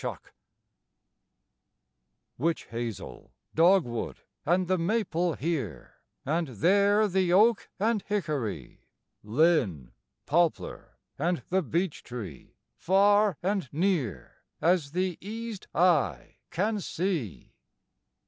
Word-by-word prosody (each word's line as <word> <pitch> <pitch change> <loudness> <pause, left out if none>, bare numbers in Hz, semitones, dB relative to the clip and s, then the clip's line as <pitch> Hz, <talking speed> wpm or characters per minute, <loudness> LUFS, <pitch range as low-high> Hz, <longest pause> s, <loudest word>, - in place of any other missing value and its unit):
THE - - -2
WOOD - - -7 2.2
Witch 165 +4 0
hazel, 115 -2 -6 0.2
dogwood, 165 -8 +2 0.3
and 180 +2 +2
the 185 0 +1
maple 175 -3 0
here; 130 - -4 0.3
And 160 +4 0
there 200 - +3
the 185 -2 +1
oak 215 +5 +4
and 220 +1 +1
hickory; 150 - -4 0.3
Linn, 105 - +1 0.3
poplar, 170 +1 0 0.2
and 170 +3 0
the 190 +1 +2
beech 170 +2 -2
tree, 105 - -9 0.2
far 205 +2 +4
and 190 -7 -1
near 160 - -1 0.2
As 165 -4 +1
the 185 -1 -1
eased 220 +1 -6
eye 150 - +2
can 210 +5 0
see. 170 - -3
175 Hz, 100 wpm, -28 LUFS, 140-195 Hz, 2.2 s, oak